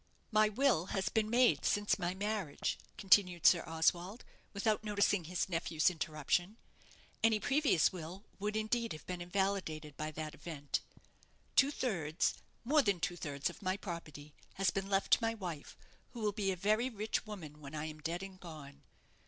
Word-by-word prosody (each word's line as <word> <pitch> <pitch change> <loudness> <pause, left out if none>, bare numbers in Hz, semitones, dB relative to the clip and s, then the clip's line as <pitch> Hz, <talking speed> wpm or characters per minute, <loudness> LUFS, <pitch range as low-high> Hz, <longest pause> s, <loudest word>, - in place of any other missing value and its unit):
"My 215 0 +5
will 215 - +2
has 190 - +1
been 215 -1 +1
made 245 +2 +4
since 205 0 +2
my 175 0 -1
marriage," 200 -6 -2 0.2
continued 185 -4 +4
Sir 175 - +7
Oswald, 175 +6 0 0.3
without 215 +1 0
noticing 205 -3 +2
his 180 +2 -1
nephew's 165 -1 +1
interruption; 165 +5 -1 0.7
"any 225 -1 +4
previous 275 - +3
will 180 +3 -7 0.2
would, 210 +2 -2
indeed, 225 +2 0
have 155 - -10
been 180 -1 -5
invalidated 175 -5 -1
by 155 0 -2
that 155 0 -5
event 145 -4 -3 0.8
Two 275 - +6
thirds 175 - 0 0.3
more 295 +5 +4
than 200 -7 +1
two 175 +1 -1
thirds 145 -5 -3
of - - -15
my 185 0 0
property 155 -6 -7 0.2
has 195 0 +2
been 195 0 -3
left 195 0 +1
to - - +7
my 225 0 0
wife, 175 -8 -6 0.4
who 235 - -7
will 210 -1 +2
be 200 -1 0
a - - -1
very 215 +7 +2
rich 215 -1 -2
woman 155 -8 -8
when 140 +1 -8
I 150 0 -3
am 155 -1 -7
dead 170 +4 -3
and 190 -1 -9
gone. 145 -5 -10
190 Hz, 170 wpm, -34 LUFS, 160-215 Hz, 0.8 s, Sir